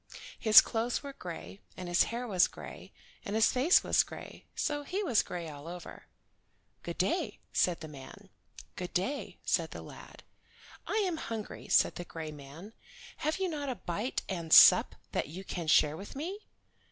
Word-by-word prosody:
His 220 -2 +9
clothes 235 +3 -2
were 280 -1 -7
gray, 180 -2 -8 0.2
and 180 - -6
his 175 0 +3
hair 240 +2 -4
was 185 -5 +4
gray, - - -11 0.3
and 200 - -4
his 220 0 +4
face 270 +8 +4
was - - +4
gray, - - -9
so 295 -1 -1
he 370 +8 -3
was 245 - +3
gray 170 -2 -6
all 145 0 -9
over. 175 0 -9 0.7
"Good - - -6
day," - - 0 0.2
said 175 -3 +1
the 160 - -6
man. 150 +8 -12 0.5
"Good 180 -1 -6
day," 260 +11 -2
said - - +1
the - - -8
lad. - - -12 0.6
"I - - -2
am 350 -3 -2
hungry," 225 -7 -6
said - - +3
the 175 - -5
gray 160 -2 -7
man. 150 +8 -11 0.4
"Have 310 +1 -1
you 380 -1 0
not 295 -5 -4
a 255 - -2
bite 210 +6 -3
and 170 -4 -5
sup - - +8 0.2
that - - -1
you 175 +6 -8
can 175 -3 -5
share 150 0 +4
with 195 +9 -9
me?" 365 +9 -6
200 Hz, 175 wpm, -31 LUFS, 170-270 Hz, 0.7 s, His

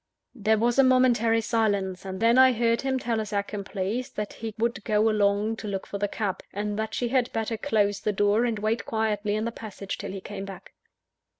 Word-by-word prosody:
There 220 -2 +2
was 235 +4 +2
a - - +8
momentary 240 -3 +4
silence; 200 -5 0
and 190 -1 -5
then 230 +3 +4
I 260 0 +7
heard 230 0 +1
him 265 -1 0
tell 235 -3 -1
his 215 - -4
accomplice 200 +3 -3
that 210 -1 -5
he 220 -2 -6
would 225 -2 -1
go 215 +1 +2
alone 205 +1 +1
to 215 - -6
look 195 -2 -3
for 200 - -6
the 205 - +1
cab, 200 -2 -3
and 205 +1 -3
that 220 0 -3
she 245 - -1
had 250 -1 +1
better 225 0 -1
close 205 -2 +1
the 210 - 0
door 205 +3 +2
and 235 -3 0
wait 215 +2 -1
quietly 210 -2 0
in 215 +1 -1
the 230 - -2
passage 205 -4 -7
till - - -5
he 195 - -5
came 195 0 -7
back. 195 -2 -10
215 Hz, 215 wpm, -26 LUFS, 205-230 Hz, -, a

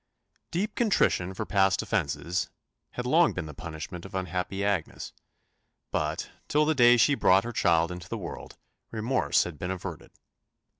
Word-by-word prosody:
Deep 205 +5 -2
contrition 185 - +2
for 100 +3 -4
past 95 -2 +2
offences 85 -3 -1 0.4
had 125 - -4
long 160 +6 +4
been 90 - -4
the 75 - -8
punishment 80 +3 -7
of 95 - -9
unhappy 95 +2 -2
Agnes; 100 -6 -2 0.8
but, - - -2 0.2
till 150 +1 +3
the 160 - +2
day 120 -3 +6
she 145 +5 +4
brought 95 -7 +4
her 120 - -4
child 85 -4 +2
into 90 -1 -8
the - - -3
world, - - -8 0.3
remorse 115 +4 +1
had 80 -5 -8
been 90 - -3
averted. 95 -1 -6
95 Hz, 155 wpm, -28 LUFS, 85-120 Hz, 0.8 s, day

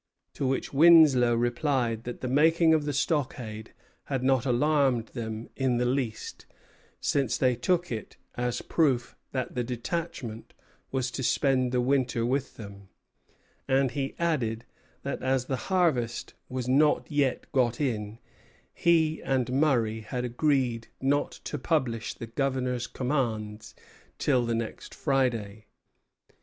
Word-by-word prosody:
To 135 - -2
which 135 +2 -2
Winslow 145 -6 +7
replied 120 -1 0
that 120 - -6
the 130 - -2
making 160 +5 +4
of 155 -2 +2
the 145 - -1
stockade 125 -7 -2 0.3
had 135 -3 -2
not 130 -1 +2
alarmed 130 -2 +2
them 110 -2 -5
in 130 -3 +1
the 125 - +1
least, 125 -3 -3 0.5
since 135 -5 0
they 130 -2 +2
took 175 +7 0
it 110 -3 -6 0.2
as 120 0 -2
a - - -10
proof 135 -7 +1 0.2
that 130 -2 -3
the 125 - -1
detachment 125 -1 -5 0.4
was 130 -1 -1
to 135 - -4
spend 130 +1 +2
the 125 -1 +1
winter 125 -2 +1
with 130 +2 -1
them; 100 -3 -10 0.8
and 135 -1 +2
he 135 -1 -3
added, 120 -10 -1 0.4
that - - -4
as 130 -1 +1
the 130 - -1
harvest 155 -11 +1 0.2
was 125 -1 -3
not 145 +4 +3
yet 145 -3 +1
got 120 -4 +1
in, 110 -6 -2 0.6
he 160 -2 +2
and 130 -2 0
Murray 125 -6 +2
had 125 +3 -4
agreed 125 -2 0
not 140 +2 +1
to 150 - -4
publish 125 -7 -1
the - - -7
Governor's 125 0 -1
commands 110 -6 -3 0.4
till 125 -5 +1
the 115 - 0
next 115 -1 -5
Friday. 115 -7 -1
130 Hz, 140 wpm, -28 LUFS, 120-140 Hz, 0.8 s, Winslow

